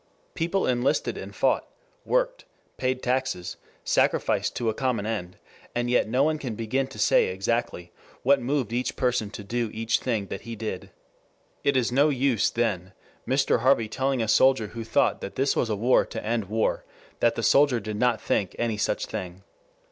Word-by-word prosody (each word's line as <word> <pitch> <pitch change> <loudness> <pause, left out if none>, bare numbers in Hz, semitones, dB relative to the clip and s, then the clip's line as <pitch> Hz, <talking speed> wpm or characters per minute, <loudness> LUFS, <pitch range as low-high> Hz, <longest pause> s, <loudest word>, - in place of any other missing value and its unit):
People 175 +3 0
enlisted 125 +1 +1
and - - -8
fought, - - +1 0.4
worked, - - 0 0.3
paid 130 0 -1
taxes, 125 -8 -1 0.3
sacrificed - - +1
to 120 - -2
a 110 - +2
common 120 -3 -1
end, 100 -5 -4 0.4
and 120 0 0
yet 125 - +2
no 130 +4 +2
one 155 +1 +1
can 125 -7 -4
begin 125 +5 -1
to 135 - -12
say 105 - +4
exactly 95 -2 -2 0.3
what 135 +1 +4
moved 125 -3 -1
each 125 +1 -1
person 125 -4 0
to 105 - -8
do 115 +2 -2
each 115 0 0
thing 115 -6 -1
that 95 - -6
he 115 0 -7
did. 110 -4 -5 0.7
It 140 -1 +2
is 125 -2 +1
no 140 +4 +4
use, 130 -5 +2
then, 95 -6 -2 0.3
Mr. 130 -1 +2
Harvey 120 -2 +3
telling 130 +2 -1
a - - -2
soldier 115 0 +4
who 115 +1 -6
thought 110 - +1
this 135 +7 -1
was 115 - 0
a 105 - 0
war 120 +5 +3
to 110 - -6
end 115 -1 0
war 110 +3 0 0.4
that 115 -1 +3
the 115 - -3
soldier 140 -2 +4
did 105 0 -5
not 120 -1 +2
think 95 -4 -1
any 115 -2 -1
such 105 - -1
thing. 95 -3 -6
120 Hz, 180 wpm, -26 LUFS, 110-130 Hz, 0.7 s, say